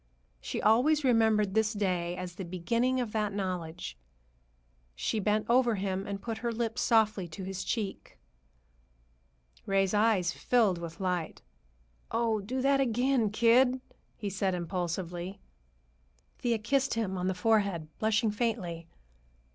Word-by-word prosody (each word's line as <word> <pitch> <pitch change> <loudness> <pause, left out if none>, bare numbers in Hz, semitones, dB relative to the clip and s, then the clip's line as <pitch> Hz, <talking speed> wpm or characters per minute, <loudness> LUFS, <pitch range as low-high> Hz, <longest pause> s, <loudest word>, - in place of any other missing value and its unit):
She - - -4
always 275 +8 +4
remembered 220 -5 +3
this 220 0 +2
day 180 -4 -1
as 180 -1 -5
the 190 - -6
beginning 230 +9 0
of 240 -4 -2
that 215 -1 0
knowledge. 175 - -4 1.0
She 215 - -1
bent 210 +1 +1
over 240 -1 +3
him 195 0 -2
and 200 -1 -4
put 225 -2 -4
her 235 +1 -1
lips 230 0 -2
softly 215 -5 +2
to 170 +4 -8
his 190 0 -4
cheek. 210 -5 -4 1.5
Ray's 195 -1 +2
eyes 205 -4 +3
filled 215 -7 +2
with 165 -1 -7
light. 180 -4 -2 0.7
"Oh, 225 -1 +1
do 255 +6 -3
that 275 0 +4
again, 245 -2 +2
kid!" 240 +4 +4 0.4
he 205 -2 -4
said 195 -1 0
impulsively. 175 +1 -4 1.0
Thea 235 -2 +1
kissed 265 +4 0
him 210 -5 -1
on 180 0 -2
the 190 - 0
forehead, 200 -5 +1
blushing 220 0 +2
faintly. 205 -7 -2
210 Hz, 135 wpm, -30 LUFS, 185-230 Hz, 1.5 s, always